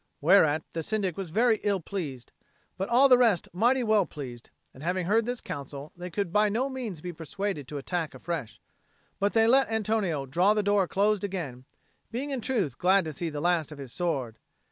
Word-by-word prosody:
Whereat 155 -2 +4
the 165 - -2
Syndic 195 -1 -1
was 195 -3 -5
very 220 +4 +3
ill 200 -2 +1
pleased, 150 -9 -6 0.4
but 195 - -3
all 250 +4 +6
the 250 -2 +6
rest 225 -8 +3
mighty 245 +7 +3
well 215 -4 +3
pleased; 125 -5 -8 0.2
and, 130 - -14
having 180 +2 -1
heard 220 +5 +2
this 245 0 -2
counsel, 140 +1 -7
they 180 +1 -7
could 185 -1 -3
by 210 0 +4
no 245 +6 0
means 235 - -5
be 175 +1 -5
persuaded 165 -1 -4
to 145 - -6
attack 160 +3 -3
afresh, 160 -10 -5 0.6
but 200 +1 +1
they 225 -1 +5
let 265 +3 +4
Antonio 215 -9 0
draw 180 +10 +3
the 210 - +1
door 205 -2 +2
close 205 +2 +1
again, 155 -11 -4 0.4
being 265 +5 -4
in 265 -3 -2
truth 210 - -1
glad 190 0 +4
to 155 - -4
see 165 +4 -3
the 145 -1 -5
last 170 -3 +1
of 150 - -9
his 135 -4 -9
sword. 135 -11 -2
185 Hz, 200 wpm, -28 LUFS, 155-215 Hz, 0.6 s, all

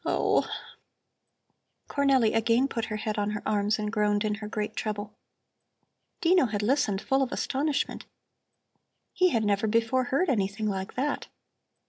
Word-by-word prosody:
Oh!" - - +1 1.4
Cornelli 270 -6 +3
again 230 +4 +3
put 230 -4 -3
her 215 - -4
head 215 0 -2
on 205 0 0
her 210 0 -4
arms 210 0 +1
and 210 -1 -3
groaned 210 -1 +1
in 210 - 0
her 210 - -5
great 215 0 -3
trouble. 210 -1 -4 1.1
Dino 350 -5 +4
had 205 -1 -2
listened, 210 -5 +1
full 270 0 +2
of 260 - 0
astonishment. 285 +1 -1 1.1
He 365 -1 +4
had 225 -8 +1
never 205 +1 +1
before 230 +4 +2
heard 275 +9 +1
anything 215 -4 0
like 190 -2 -3
that. 280 +3 -1
220 Hz, 145 wpm, -27 LUFS, 210-265 Hz, 1.4 s, Dino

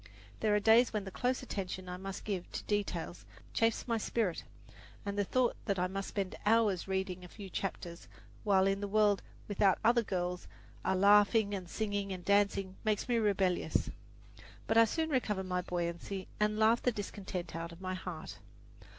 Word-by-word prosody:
There 215 -1 +2
are - - +4
days 225 +4 +5
when 210 -2 -1
the 195 - -7
close 250 +6 -1
attention 185 -5 -4
I 180 - -4
must 190 +1 -6
give 190 -4 -3
to - - -4
details 195 -5 -2 0.3
chafes 225 +1 +1
my 230 -2 +1
spirit, 215 -5 -1 0.6
and 200 0 -2
the 205 - +2
thought 250 +4 +1
that 200 -3 0
I 180 - +1
must 195 +1 -3
spend 195 -3 -3
hours 210 -5 +3
reading 190 -1 -2
a - - -8
few 195 +1 -10
chapters, 175 -3 -4 0.4
while 195 -2 +4
in 195 +1 +1
the 205 - -2
world 205 -1 +3 0.3
without 200 -2 +3
other 235 +2 +5
girls 180 -4 -3 0.4
are 190 - +1
laughing 205 +2 +5
and 185 -3 -4
singing 205 -1 -2
and 185 -2 -6
dancing, 200 -1 +2
makes 215 -2 0
me 240 -2 +2
rebellious; 195 -4 +1 0.7
but 225 - 0
I 230 0 +8
soon 320 +7 -1
recover 210 -8 0
my 180 -1 -1
buoyancy 175 +2 -3
and 210 0 +2
laugh 220 +2 +4
the 250 - +2
discontent 195 -5 -5
out 165 0 -4
of 170 - -12
my 185 0 -3
heart. 180 -3 -6
200 Hz, 180 wpm, -33 LUFS, 185-215 Hz, 0.7 s, I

